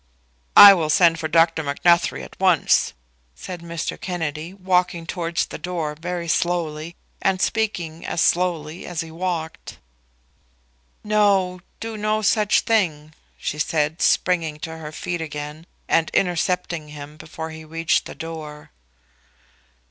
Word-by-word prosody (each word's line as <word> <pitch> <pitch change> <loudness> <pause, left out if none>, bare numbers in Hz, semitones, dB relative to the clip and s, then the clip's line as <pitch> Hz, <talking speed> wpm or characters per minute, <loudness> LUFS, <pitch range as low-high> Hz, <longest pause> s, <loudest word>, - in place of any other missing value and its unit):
"I 200 -1 +12
will 165 -5 -1
send 165 0 +4
for 160 - -2
Dr. 165 0 +3
Macnuthrie 170 +4 +2
at - - -12
once," 185 -4 +3 0.4
said 175 - -8
Mr. 170 -1 -5
Kennedy, 160 -2 -4
walking 180 -3 0
towards 170 0 -2
the - - -9
door 170 -4 -3
very 170 +2 -5
slowly, 170 -1 -1 0.3
and 190 -1 +1
speaking 180 -8 -1
as - - -3
slowly 170 -2 0
as 175 -2 -3
he 165 -1 -8
walked. 165 -1 -4 1.3
"No; 200 -4 +2 0.2
do 225 -1 -5
no 215 +1 0
such 210 0 +3
thing," 155 -9 0 0.2
she 150 - -4
said, 155 +1 0
springing 165 -4 +2
to 160 -1 -5
her 155 -1 -8
feet 175 +2 -4
again 150 +1 -7 0.2
and 165 -1 +2
intercepting 175 -3 0
him 150 0 -10
before 160 +1 -8
he 160 0 -9
reached 165 +1 0
the - - -9
door. 155 -2 -8
165 Hz, 135 wpm, -22 LUFS, 155-180 Hz, 1.3 s, I